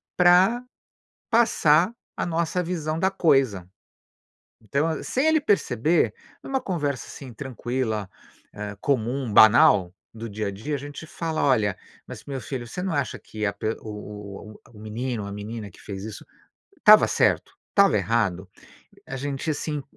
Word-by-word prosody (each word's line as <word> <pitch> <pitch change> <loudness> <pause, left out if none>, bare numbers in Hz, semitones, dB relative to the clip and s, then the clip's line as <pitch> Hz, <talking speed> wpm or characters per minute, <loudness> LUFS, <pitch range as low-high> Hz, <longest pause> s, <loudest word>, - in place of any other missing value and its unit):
pra 185 +7 +5 0.7
passar 220 -5 +4 0.2
a - - -2
nossa 170 +1 -1
visão 160 -3 -2
da 190 +3 +1
coisa. 135 - +2 1.1
Então, 140 +3 +2
a 160 - -3
sem 265 +5 0
ele 315 0 +4
perceber, 155 - +2 0.3
numa 265 -1 -2
conversa, 145 - -2
assim, 130 -4 -10
tranquila, 120 -5 -3 0.4
eh, 105 0 -6
comum, 130 -2 -1
banal, 100 -4 +6 0.2
do 115 +1 -7
dia 105 0 -3
a - - -2
dia, 110 +10 -4
a - - -2
gente 145 +2 -8
fala: 160 -1 -3
"Olha, 110 -8 +2 0.3
mas - - -10
meu 135 -2 -5
filho, 120 +1 -5
você 180 +10 -6
não 185 -3 -2
acha 140 -2 -1
que 105 -1 -5
a 100 - 0
p 100 +2 -3
o 110 - -8
o 105 0 -8
o - - -18
o - - -13
menino 110 +2 -4
ou 100 - -6
a - - -7
menina 105 +1 -6
que - - -19
fez 95 -1 -7
isso 110 -1 -8 0.5
estava - - +7
certo? - - +1 0.2
Estava - - +4
errado?" 100 -5 0 0.6
A 135 - -5
gente, 140 +3 -3
assim, 150 -1 -3
130 Hz, 160 wpm, -25 LUFS, 105-160 Hz, 1.1 s, estava